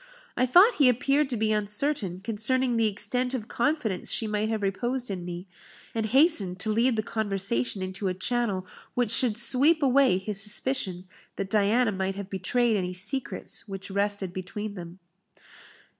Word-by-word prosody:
I 255 - +1
thought 370 - +6
he 275 -3 +6
appeared 275 +4 +1
to 245 - -2
be 215 0 0
uncertain 210 - -1
concerning 235 +4 0
the 225 -1 +2
extent 250 +5 -2
of 220 -4 -5
confidence 240 - -1
she 225 - +1
might 215 0 -1
have 220 -2 -2
reposed 240 +5 -2
in 185 -2 -5
me, 175 +1 -7 0.5
and 225 -1 -1
hastened 225 - +3
to 215 - -2
lead 235 +3 +2
the 215 - -1
conversation 195 - -1
into 190 +2 -4
a 185 - -1
channel 200 -1 -1 0.3
which 245 -3 0
should 230 -2 +3
sweep 280 +7 +3
away 265 -6 +4
his 195 +1 -1
suspicion 205 -4 0 0.3
that 195 0 -5
Diana 220 +3 +3
might 190 0 -2
have 200 0 -7
betrayed 225 +5 +1
any 180 -1 -3
secrets 230 +1 -2
which 195 0 -7
rested 200 -2 -1
between 200 +3 -6
them. 175 -2 -9
215 Hz, 165 wpm, -26 LUFS, 195-250 Hz, 0.5 s, thought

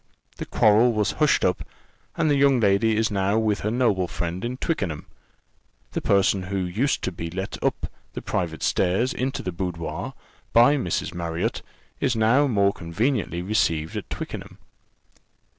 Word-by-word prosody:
The - - -6
quarrel 110 +3 +4
was 105 -1 +1
hushed 150 - +4
up, 90 - +1 0.6
and 160 - +2
the 145 - +3
young 140 -2 +4
lady 105 +1 +3
is 110 -1 +1
now 100 +1 +1
with 110 -2 +1
her 105 - -1
noble 110 -6 +1
friend 85 +1 -4
at 125 +2 -4
Twickenham. 95 - -2 0.9
The - - -3
person 100 -1 +3
who 95 +2 -4
used 95 +10 0
to 95 - -1
be 85 -1 -5
let 95 +3 -5
up - - 0 0.3
the - - -5
private 80 -3 -2
stairs 95 +8 +1
into 130 +2 -2
the 90 - -3
boudoir, 85 -2 -4 0.4
by 120 +5 +6
Mrs. 90 - -2
Marriott, 85 -1 -2 0.4
is 130 -4 +1
now 115 +6 +4
more 100 -5 +2
conveniently 95 +1 -1
received 85 -6 0
at - - -5
Twickenham." - - -6
100 Hz, 160 wpm, -24 LUFS, 90-120 Hz, 0.9 s, by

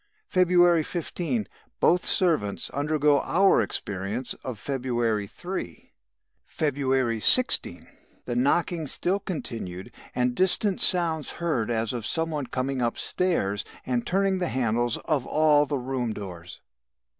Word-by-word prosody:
"February 175 -2 +4
15. 155 - -3 0.3
Both 180 - +3
servants 155 - 0
undergo 145 0 +2
our 195 +3 +3
experience 105 +6 -3
of 130 -4 -5
February 120 -4 -1
3. 175 - -7 0.5
"February 130 -5 -1
16. 180 - +3 0.4
The 120 - -3
knockings 155 +4 +1
still 190 +3 0
continued 115 - -6 0.2
and 125 0 +1
distant 185 - +3
sounds 165 -4 +2
heard 150 -11 -1
as 115 -1 -1
of 120 -3 -3
some 165 0 -1
one 145 -4 -3
coming 130 +1 -2
upstairs 120 - 0 0.2
and 125 -2 -1
turning 195 0 +1
the 180 - 0
handles 120 -1 0
of 145 -6 0
all 150 -1 +3
the 145 - -1
room 125 -3 -3
doors. 90 -4 -9
135 Hz, 120 wpm, -26 LUFS, 115-170 Hz, 0.5 s, February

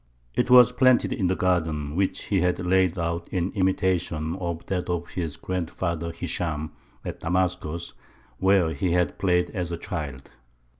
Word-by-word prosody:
It 125 - 0
was 125 -1 +8
planted 130 0 +4
in 95 - 0
the 95 - +1
garden 80 -6 0
which 95 +1 0
he 95 -3 +1
had 90 0 +2
laid 95 0 +2
out 85 0 -2
in 90 0 -1
imitation 90 -4 0
of 85 -3 -4
that 90 -2 -2
of 85 -1 -2
his 80 -5 -4
grandfather 85 -2 -3
Hishām 80 -3 -3 0.3
at - - -5
Damascus, 85 -1 -1 0.5
where 95 -3 +3
he 85 +4 0
had 90 -1 +1
played 90 -2 +2
as 90 -4 -3
a 85 - -2
child. 70 -6 -6
90 Hz, 155 wpm, -25 LUFS, 85-95 Hz, 0.5 s, was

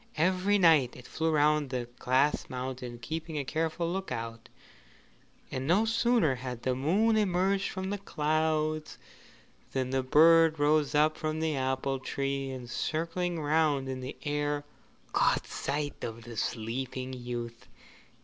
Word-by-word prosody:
Every 185 +5 +3
night 160 -9 +5
it 125 - -12
flew 160 0 -1
round 150 -1 +3
the 125 -2 -3
Glass 130 +4 +2
Mountain 125 -1 -5
keeping 160 +3 -4
a 140 - -2
careful 160 +3 -1
look 190 +3 -3
out, 115 0 -5 1.0
and 130 +1 -3
no 195 +7 +4
sooner 230 - +3
had 125 -1 -6
the 130 - +1
moon 190 - +2
emerged 195 -1 +1
from 190 +1 -4
the 205 - -2
clouds 155 -2 -1 0.8
than 130 -1 -1
the 135 0 +1
bird 160 +4 +6
rose 150 0 +2
up 155 +1 +3
from 155 0 -2
the 160 -1 0
apple 130 0 -1
tree, 135 +1 -2
and 130 -2 -6
circling 165 +6 -2
round 150 -2 +2
in 130 -1 -4
the 130 +2 -7
air, 145 -1 -1 0.5
caught - - +2
sight 145 +1 -3
of 115 0 -5
the 120 0 -9
sleeping 125 +4 -3
youth. 120 -1 -6
145 Hz, 145 wpm, -30 LUFS, 130-165 Hz, 1.0 s, bird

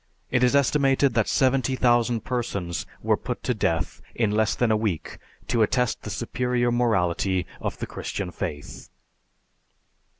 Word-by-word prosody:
It 125 0 +2
is 125 +2 +4
estimated 140 -1 +3
that 115 -2 +2
70,000 125 -3 +2
persons 100 - -3 0.2
were - - +3
put - - -5
to 125 - +1
death 90 -6 -1
in 110 -3 +1
less 110 0 +2
than 120 -2 +1
a - - +4
week 105 -8 -2 0.3
to 115 - +1
attest 125 +2 +1
the - - -7
superior 120 +3 0
morality 95 -6 +1
of - - -4
the - - -4
Christian 95 -3 -5
faith. 75 -3 -6
115 Hz, 140 wpm, -25 LUFS, 100-125 Hz, 0.3 s, is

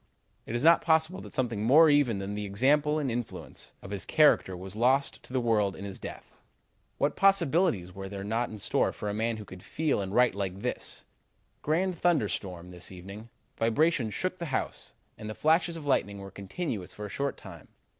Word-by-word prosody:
"Is 120 +3 -2
it - - +1
not 170 +1 +7
possible 160 +3 +2
that - - -11
something 115 -5 -1
more 150 +8 +7
even 145 -7 +3
than 100 +1 -4
the 105 0 -3
example 145 +9 +2
and 140 -5 -1
influence 120 0 -6
of 100 - -9
his 100 -4 -3
character 150 - +3
was 95 +2 -8
lost 130 +5 +2
to - - -14
the 130 - +1
world 105 -5 +1
in 100 - -7
his 100 -1 -7
death? - - -8 0.7
What 145 +1 +1
possibilities 170 - +2
were 95 0 -7
there 100 -1 -6
not 115 +4 -1
in 110 - -8
store 100 - +1
for 105 - -4
a - - -2
man 110 +2 -1
who 105 - -8
could 90 -1 -11
feel 155 - -1
and 95 -1 -4
write 125 +1 +4
like 95 -1 -4
this: - - -4 0.6
'Grand 175 +3 0
thunderstorm 100 - 0
this 90 +1 -6
evening. 100 +5 -10 0.3
Vibrations 115 0 +2
shook 185 0 -2
the 170 - -3
house 135 - -3 0.2
and 110 - -6
the 110 - -5
flashes 165 +2 +2
of 155 - -8
lightning 100 -7 +1
were 100 0 -9
continuous 100 - -5
for 105 - -7
a - - -6
short 140 +7 -2
time. - - -12
115 Hz, 200 wpm, -29 LUFS, 100-150 Hz, 0.7 s, not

